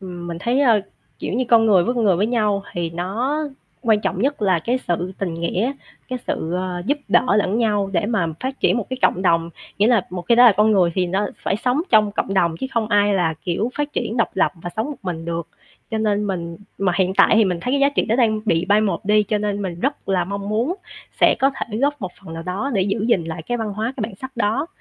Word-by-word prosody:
Ừm, 175 -2 -7
mình 170 -1 -5
thấy, 240 +6 +1
ờ, 230 -7 +4 0.4
kiểu - - -4
như, 255 +2 +1
con 225 -1 +5
người 190 -5 +5
với 245 - 0
con 235 -2 0
người 190 -4 +4
với 200 +4 +1
nhau 210 -4 +1
thì 170 -1 -2
nó 205 - -2 0.4
quan 220 -4 +3
trọng 195 - -2
nhất 275 -3 0
là 190 -4 +3
cái 240 +10 -1
sự 175 +2 -1
tình 180 -4 -2
nghĩa, 180 +9 -1 0.4
cái 255 -1 -3
sự, 160 - -2
ờ, 180 -1 -3
giúp 285 +4 +1
đỡ 245 -5 +3
lẫn 210 +1 +1
nhau 205 -4 +1
để 180 +1 +1
mà 210 -7 0
phát 265 +1 -4
triển - - +3
một 235 - -2
cái 260 - -2
cộng 185 - +2
đồng. 165 -2 +2 0.3
Nghĩa 205 - +4
là 230 -6 +3
một 180 -1 -5
khi 235 - +6
đã 245 +1 +7
là 235 - +8
con 210 +2 +4
người 180 -4 +3
thì 185 -1 +1
nó 195 +4 0 0.2
phải 195 - 0
sống 250 +6 0
trong 215 -2 +4
cộng 195 - -2
đồng 170 -4 +2
chứ - - -1
không 225 -2 0
ai 205 -1 +3
là, 170 -4 +1
kiểu, 195 +7 -1
phát 295 0 -1
triển 235 -1 -2
độc 230 - +1
lập - - +2
và 175 - -5
sống 220 - 0
một 290 - -6
mình 170 -4 -4
được. 170 0 -4 0.4
Cho 220 - -1
nên 210 -1 +1
mình 170 -3 -4 0.2
mà 195 -2 +1
hiện 190 0 +1
tại - - +5
thì 220 - +5
mình 180 -3 -1
thấy 250 +8 -2
cái 280 - +2
giá 280 - +5
trị 285 - 0
đó 225 - 0
đang 220 -4 +2
bị 170 -5 +1
bai 205 +3 +3
một 195 -5 -1
đi, 210 +1 +4
cho 210 +1 -1
nên 205 -1 -2
mình 175 -3 -5
rất 275 -3 -2
là 185 -2 +1
mong 200 +2 -5
muốn 230 +11 0 0.5
sẽ - - +6
có 270 - +3
thể 230 -5 -5
góp 285 +2 0
một 185 -3 -5
phần 165 -5 -9
nào 165 - -6
đó 190 +10 -3
để 195 - +2
giữ 205 +2 -1
gìn 190 -8 +2
lại 160 0 -6
cái 240 +9 -2
văn 220 -2 -3
hóa, 220 +4 -2
cái 245 - -3
bản 215 -1 -4
sắc 260 +4 -9
đó. 230 +6 0
205 Hz, 270 wpm, -21 LUFS, 180-235 Hz, 0.5 s, là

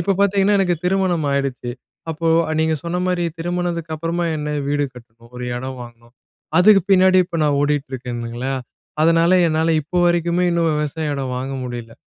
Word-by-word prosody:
இப்ப 195 +3 +1
பார்த்தீங்கன்னா, 200 0 +3
எனக்கு 180 -2 +2
திருமணம் 180 -4 +1
ஆயிடுச்சு. 135 -3 -2 0.4
அப்போ 165 +1 -2 0.3
நீங்க 160 0 +2
சொன்ன 170 +1 -2
மாரி, 180 -1 0
திருமணத்துக்கு 170 -1 -2
அப்பறமா 165 +2 -2
என்ன? 150 0 -3
வீடு 145 0 +1
கட்டணும், 115 -1 -16
ஒரு 125 - -5
இடம் 130 +1 -6
வாங்கணும். 120 0 -15 0.4
அதுக்கு 195 +1 +6
பின்னாடி 185 0 +5
இப்ப 170 - -4
நான் 145 -1 +2
ஓடிட்டுருக்கேனுங்களா, 130 -3 -2 0.5
அதனால 165 +2 +4 0.2
என்னால 160 +1 +1
இப்ப 175 +5 -1
வரைக்குமே 175 +1 +1
இன்னும் 170 -1 +2
விவசாய 150 0 -2
இடம் 130 -2 -3
வாங்க 130 +2 -4
முடியல. 120 -2 -7
160 Hz, 155 wpm, -20 LUFS, 130-175 Hz, 0.5 s, அதுக்கு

